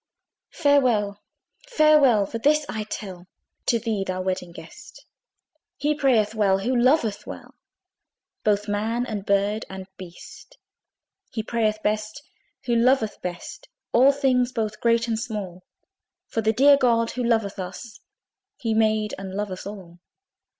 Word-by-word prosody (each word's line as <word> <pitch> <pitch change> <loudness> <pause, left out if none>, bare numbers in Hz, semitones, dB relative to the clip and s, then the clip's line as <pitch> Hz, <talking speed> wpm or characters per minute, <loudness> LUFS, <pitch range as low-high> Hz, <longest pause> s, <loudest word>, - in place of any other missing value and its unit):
Farewell, 235 -8 +2 0.5
farewell! 300 - +4
but 230 - -4
this 300 +2 +3
I 215 -1 -4
tell 185 -4 -7 0.4
To 235 - +3
thee, 220 -4 -2
thou 185 -1 -4
Wedding 185 -2 -3
Guest! 170 - -13 0.7
He 300 +1 +1
prayeth 240 -8 +2
well, 200 -3 +2
who 240 +7 -1
loveth 240 -3 +2
well - - -9 0.9
Both 205 0 +1
man 220 +4 -1
and 210 -4 -5
bird 200 +2 +1
and 190 0 -7
beast. 185 - -12 0.7
He 220 - -4
prayeth 215 -1 -1
best, 215 +5 -2 0.4
who 240 -2 +1
loveth 235 -2 +2
best 175 -1 -7 0.2
All 260 +4 +6
things 260 -3 +1
both 215 -3 -3
great 230 0 +2
and 225 -1 -1
small; 205 -6 -5 0.6
For 225 - -3
the 220 0 +2
dear 280 +5 +6
God 230 -3 +2
who 250 - -3
loveth 225 -4 0
us 190 +5 -8 0.6
He 225 -2 -2
made 215 -1 +1
and 190 -1 -7
loveth 200 -2 -4
all. 185 -4 -10
220 Hz, 135 wpm, -24 LUFS, 200-245 Hz, 0.9 s, All